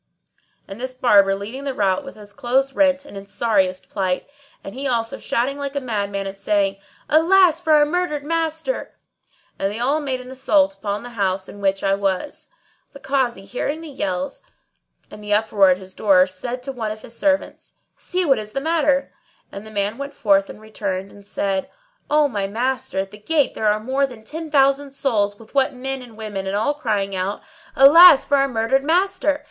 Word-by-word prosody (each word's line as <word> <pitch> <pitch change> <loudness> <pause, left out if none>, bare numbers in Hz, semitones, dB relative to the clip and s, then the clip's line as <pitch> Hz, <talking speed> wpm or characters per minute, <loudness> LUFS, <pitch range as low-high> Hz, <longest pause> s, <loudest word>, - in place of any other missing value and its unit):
and 195 +5 -9
this 255 0 -4
Barber 200 -6 +4
leading 220 +8 -7
the 275 -2 -3
rout 195 +3 +1
with 275 - -10
his 205 -1 -12
clothes 265 +5 0
rent 280 0 +2
and 285 - -12
in 195 0 -9
sorriest 200 -3 0
plight; 185 -2 -2 0.4
and 195 - -8
he 270 +3 -4
also 230 -3 -1
shouting 270 +4 -1
like 280 0 -4
a - - +1
madman 205 -6 -3
and 195 0 -6
saying, 195 -1 0 0.3
"Alas 335 +1 +4
for 315 -3 +2
our 300 -1 +6
murdered 300 -2 -2
master!" 325 +7 -2 0.6
And 195 - 0
they 210 - -5
all 270 +6 +1
made 270 -4 -3
an 255 0 -10
assault 285 +3 +2
upon 205 -5 -4
the 245 - -9
house 195 -4 -1
in 205 - -11
which 195 0 0
I 195 - +2
was. 195 +6 -3 0.4
The 280 - -11
Kazi, 255 -9 -1
hearing 285 +7 -3
the 325 - -9
yells 185 -9 -3 0.7
and 210 - -11
the 205 0 +1
uproar 210 -2 +3
at 180 - +3
his 190 0 -12
door, 185 -3 +4
said 240 +7 -6
to 270 - -4
one 230 -5 -4
of 215 0 -7
his 235 - -10
servants, 290 +1 -1 0.2
"See 365 0 -2
what 270 -6 +3
is 215 0 -8
the - - -1
matter"; 290 -2 +1 0.4
and 200 +2 -9
the - - -9
man 205 +2 -2
went 280 0 -6
forth 195 -2 +2
and - - -10
returned 200 -3 -5
and 200 - -15
said, 195 -2 -2 0.4
"O 300 0 +4
my 205 -7 -3
master, 245 0 -2
at 195 0 -8
the 210 - -12
gate 295 +6 +1
there 220 - -1
are 210 0 +2
more 265 +5 0
than 240 -4 -13
ten 320 +7 -7
thousand 275 -1 +2
souls 210 -8 0
what 220 0 -17
with 270 -2 +1
men 270 +1 -2
and 235 -3 -13
women, 205 -3 -5
and 195 - -2
all 220 +8 +1
crying 210 -9 -2
out, 190 +2 -3 0.3
'Alas 290 +2 +8
for 285 - +2
our 275 0 +3
murdered 250 +2 0
master!' 340 -2 +1
240 Hz, 200 wpm, -21 LUFS, 200-280 Hz, 0.7 s, Alas